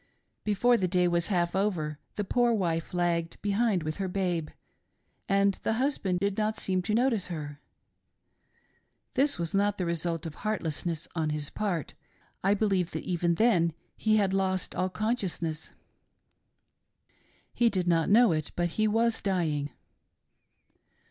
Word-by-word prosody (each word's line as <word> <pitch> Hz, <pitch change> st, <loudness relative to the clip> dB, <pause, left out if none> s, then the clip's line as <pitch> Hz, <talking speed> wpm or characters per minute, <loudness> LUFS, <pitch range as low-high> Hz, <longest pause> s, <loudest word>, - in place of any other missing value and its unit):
Before 235 Hz, +4 st, +3 dB
the 185 Hz, -, 0 dB
day 180 Hz, 0 st, +2 dB
was 170 Hz, -1 st, +2 dB
half 175 Hz, -3 st, 0 dB
over, 165 Hz, -7 st, -1 dB, 0.2 s
the 205 Hz, -, -1 dB
poor 240 Hz, +4 st, +2 dB
wife 165 Hz, -5 st, -1 dB
lagged 170 Hz, -2 st, -1 dB
behind 205 Hz, -3 st, +1 dB
with 155 Hz, 0 st, -3 dB
her 195 Hz, -1 st, -2 dB
babe, 180 Hz, -4 st, -1 dB, 0.8 s
and 200 Hz, 0 st, +3 dB
the -, -, 0 dB
husband 225 Hz, -8 st, 0 dB
did 200 Hz, +2 st, -1 dB
not 215 Hz, 0 st, 0 dB
seem 185 Hz, -1 st, 0 dB
to 210 Hz, +4 st, -1 dB
notice 235 Hz, -4 st, +2 dB
her. 150 Hz, -4 st, -6 dB, 1.5 s
This 280 Hz, +2 st, +2 dB
was 170 Hz, +1 st, -2 dB
not 205 Hz, +1 st, +2 dB
the 180 Hz, -, -1 dB
result 170 Hz, -1 st, -1 dB
of 160 Hz, -, -5 dB
heartlessness 165 Hz, -5 st, -2 dB
on 160 Hz, -2 st, -1 dB
his 150 Hz, -1 st, -3 dB
part; 190 Hz, -7 st, -2 dB, 0.5 s
I 195 Hz, +2 st, +4 dB
believe 195 Hz, -4 st, +1 dB
that -, -, -3 dB
even 170 Hz, -1 st, 0 dB
then 175 Hz, -6 st, +3 dB, 0.2 s
he 215 Hz, -1 st, +2 dB
had 195 Hz, -2 st, +2 dB
lost 190 Hz, -1 st, 0 dB
all 185 Hz, +1 st, 0 dB
consciousness. 185 Hz, -7 st, -2 dB, 1.8 s
He 240 Hz, -1 st, +3 dB
did 185 Hz, -4 st, -1 dB
not 165 Hz, -1 st, +2 dB
know 230 Hz, +1 st, +6 dB
it, 155 Hz, -2 st, -2 dB
but 175 Hz, 0 st, 0 dB
he 215 Hz, +6 st, +1 dB
was 225 Hz, +2 st, +1 dB
dying. 160 Hz, -7 st, 0 dB
185 Hz, 150 wpm, -29 LUFS, 170-210 Hz, 1.8 s, know